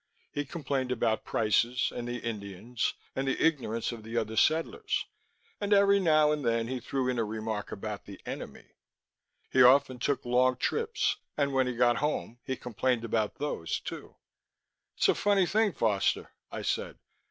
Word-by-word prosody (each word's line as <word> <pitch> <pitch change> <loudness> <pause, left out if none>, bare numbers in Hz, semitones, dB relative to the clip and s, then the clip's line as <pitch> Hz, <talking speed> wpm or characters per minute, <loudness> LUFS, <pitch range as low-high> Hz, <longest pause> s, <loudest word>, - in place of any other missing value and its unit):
He 145 - -2
complained 135 -3 -2
about 115 -3 0
prices, 115 +2 +1
and 120 0 -4
the 120 0 -3
Indians, 110 0 -3 0.2
and 135 +1 -1
the 135 - 0
ignorance 125 -9 +1
of 115 -2 -7
the 115 +2 -5
other 110 -1 -1
settlers 415 - +1 0.5
and 205 0 +1
every 200 0 +5
now 155 -4 +4
and 150 -1 -1
then 115 +2 0
threw 130 +1 -1
in 125 -2 0
a - - +2
remark 110 -1 -4
about 105 0 -5
the 100 -1 -10
Enemy. - - -7 0.9
He 130 - +5
often 130 0 +6
took 135 +1 -1
long 125 +1 +3
trips, 455 - 0 0.2
and 140 -1 +1
when 130 -1 +2
he 125 - -2
got 120 0 +3
home, 140 -5 -2
he 130 - -2
complained 120 0 -1
about 110 -2 0
those, 145 - -2
too. - - -8 0.8
"It's - - +3
a - - +5
funny 200 -2 +3
thing, 215 +3 +2
Foster," 110 - 0 0.2
I - - -5
said. - - -2
125 Hz, 165 wpm, -29 LUFS, 115-145 Hz, 0.9 s, often